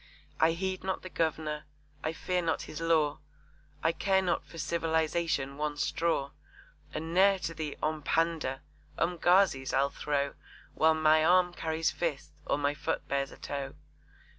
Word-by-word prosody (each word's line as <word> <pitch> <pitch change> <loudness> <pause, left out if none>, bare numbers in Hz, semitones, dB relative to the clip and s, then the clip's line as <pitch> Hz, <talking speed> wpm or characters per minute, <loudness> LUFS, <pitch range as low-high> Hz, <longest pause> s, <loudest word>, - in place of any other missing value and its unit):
I 160 +1 +5
heed 185 +2 -3
not 190 0 -2
the 185 - -8
Governor, 155 -2 -1 0.4
I 155 - 0
fear 180 +2 -1
not 165 -1 -1
his 155 - -7
law, 155 -2 +2 0.6
I 165 - +4
care 190 +2 +2
not 175 -2 0
for 165 - -13
civilisation 160 -3 0
one 150 0 -2
straw, 150 -3 0 0.6
And 160 +1 -4
ne'er 195 +2 +5
to 160 -4 -4
'Ompanda' 155 -2 0 0.4
'Umgazis' 175 -4 +3
I'll 140 +1 +2
throw 140 -1 -1 0.4
While 160 0 +4
my 155 0 +4
arm 180 +1 +4
carries 160 -1 0
fist, 165 -5 -3 0.2
or - - +2
my 145 0 +1
foot 150 -1 -3
bears 140 0 0
a - - -13
toe! 140 -1 -5
160 Hz, 145 wpm, -30 LUFS, 150-170 Hz, 0.6 s, I